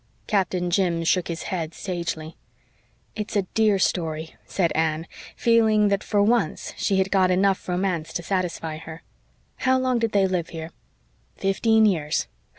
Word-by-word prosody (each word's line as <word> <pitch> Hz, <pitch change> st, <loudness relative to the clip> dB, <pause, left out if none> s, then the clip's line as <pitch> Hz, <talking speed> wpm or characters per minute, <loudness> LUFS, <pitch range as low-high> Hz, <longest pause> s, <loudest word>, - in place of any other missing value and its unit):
Captain 180 Hz, -3 st, 0 dB
Jim 175 Hz, -3 st, +1 dB
shook 180 Hz, +2 st, +2 dB
his 170 Hz, -1 st, -4 dB
head 165 Hz, -3 st, -4 dB
sagely. 165 Hz, -3 st, -4 dB, 0.8 s
"It's 215 Hz, +1 st, -5 dB
a 200 Hz, -, +3 dB
dear 215 Hz, -2 st, +3 dB
story," 160 Hz, -4 st, -1 dB
said 175 Hz, -4 st, 0 dB
Anne, 160 Hz, 0 st, 0 dB, 0.3 s
feeling 220 Hz, -3 st, +4 dB
that 200 Hz, 0 st, 0 dB
for 205 Hz, -1 st, +2 dB
once 215 Hz, -6 st, 0 dB
she 175 Hz, +5 st, 0 dB
had 190 Hz, 0 st, +1 dB
got 190 Hz, -2 st, +4 dB
enough 190 Hz, +1 st, +1 dB
romance 180 Hz, -3 st, -1 dB
to 175 Hz, -, -3 dB
satisfy 170 Hz, -4 st, -2 dB
her. 160 Hz, +1 st, -10 dB, 0.5 s
"How 260 Hz, 0 st, +2 dB
long 255 Hz, -2 st, +1 dB
did 230 Hz, -1 st, 0 dB
they 200 Hz, -1 st, +4 dB
live 180 Hz, -3 st, -1 dB
here?" 160 Hz, 0 st, -7 dB, 0.6 s
"Fifteen 220 Hz, +3 st, +3 dB
years. 160 Hz, -7 st, +1 dB
185 Hz, 155 wpm, -24 LUFS, 165-205 Hz, 0.8 s, feeling